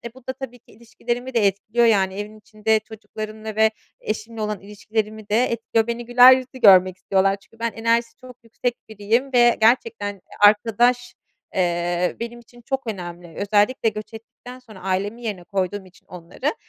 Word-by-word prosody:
bu 260 -1 -18
da 260 - -2
tabii 250 -2 -9
ki - - -23
ilişkilerimi 240 +3 -5
de 220 -4 +3
etkiliyor. 215 +4 0
Yani, 195 -4 +3
evin 210 +1 -7
içinde 215 +1 0
çocuklarımla 215 0 -8
ve 220 0 +4 0.3
eşimle 220 +1 -5
olan 210 -2 -3
ilişkilerimi 210 +1 -5
de 225 +4 +3
etkiliyor. 225 -1 -1
Beni 235 0 -4
güler 245 +1 +8
yüzlü 260 0 -4
görmek 185 -3 +6
istiyorlar. 195 +1 +1
Çünkü 215 +3 -23
ben 230 -1 -1
enerjisi 230 +1 0
çok 255 -1 -14
yüksek 235 +1 -3
biriyim 225 +6 -1
ve 240 -1 +5
gerçekten, 225 -3 +2
eee, 190 - -23 0.2
arkadaş, 240 +4 +3 0.4
eee, 175 0 0
benim 235 +1 -6
için 240 +1 -18
çok 270 0 -4
önemli. 175 -4 -7
Özellikle 210 +4 +2
göç 215 +1 -9
ettikten 245 +3 -12
sonra 220 -6 -15
ailemin 195 +5 -2
yerine 205 -6 -5
koyduğum 190 +1 -3
için 185 - -21
onları, 180 - -5
220 Hz, 165 wpm, -22 LUFS, 200-235 Hz, 0.4 s, güler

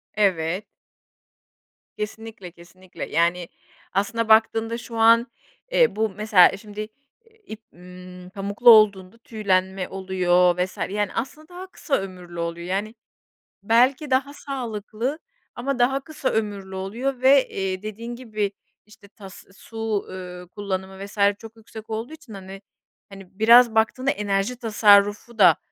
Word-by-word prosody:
Evet. 185 -2 0 1.3
Kesinlikle, 215 -3 -7
kesinlikle. 175 +2 -11
Yani, 170 +1 +1 0.5
aslında 220 +3 -1
baktığında 225 +1 +3
şu 235 -1 -9
an, 230 +2 +5 0.4
eee, - - +3
bu 220 0 0
mesela 195 -2 +4
şimdi, 210 0 -11 0.5
eee, 450 -1 -28
ip, 220 -9 -9
ımm, 180 0 -12
pamuklu 200 +4 +2
olduğunda 205 -3 +5
tüylenme 190 -5 -1
oluyor 180 -2 +1
vs. 185 +1 -2
yani, 205 0 -2
aslında 300 +6 -5
daha 360 +1 -9
kısa 305 -6 -2
ömürlü 180 -3 -8
oluyor. 170 +1 -4
Yani 205 +4 -3 0.7
belki 255 +6 +2
daha 270 +2 +1
sağlıklı 245 0 -5 0.4
ama 255 +1 -3
daha 265 +3 +2
kısa 295 -1 -4
ömürlü 200 -3 -3
oluyor 240 +8 -4
ve, 265 +1 +5
eee, 190 -1 -3
dediğin 225 +3 -7
gibi 215 -5 -3 0.3
işte, 210 -1 -18
tas, 195 -2 -13
su, 225 -2 -4
ııı, 180 -1 -9
kullanımı 190 0 -5
vs. 200 - -14 0.2
çok 225 0 -13
yüksek 220 0 -12
olduğu 225 +6 -5
için, 290 -8 -13
hani, 195 0 -10 0.5
hani, 195 0 -14
biraz 235 +1 +6
baktığında 255 +5 +1
enerji 205 0 -1
tasarrufu 210 0 +3
da 180 -5 +7
210 Hz, 130 wpm, -23 LUFS, 190-230 Hz, 1.3 s, da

